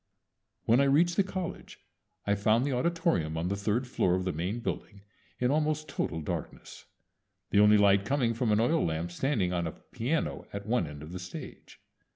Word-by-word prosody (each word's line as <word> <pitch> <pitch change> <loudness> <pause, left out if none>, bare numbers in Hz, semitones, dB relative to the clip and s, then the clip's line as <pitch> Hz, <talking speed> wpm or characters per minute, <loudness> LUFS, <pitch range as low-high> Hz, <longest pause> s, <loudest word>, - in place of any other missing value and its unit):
When 115 +3 +4
I 140 - +4
reached 165 +6 +3
the - - +4
college 185 -2 -6 0.5
I 100 - +2
found 110 +5 +2
the 145 - -1
auditorium 125 - 0
on 85 +2 -1
the 100 - 0
third 105 +5 0
floor 90 -7 +1
of 95 0 -2
the 90 - -1
main 90 +9 -2
building 105 -3 -5 0.4
in 125 +1 +1
almost 155 +1 0
total 80 - -3
darkness, 75 - -6 0.7
the 100 - +4
only 105 0 +7
light 100 -1 +5
coming 125 0 +1
from 115 -1 0
an 105 - +3
oil 155 +8 +2
lamp 80 +1 -2
standing 100 -3 0
on 85 -1 -1
a - - -5
piano 140 +8 -3
at 100 0 -6
one 110 -7 +1
end 75 0 -9
of 80 - -9
the 90 - -5
stage. 90 0 -9
105 Hz, 190 wpm, -29 LUFS, 90-135 Hz, 0.7 s, only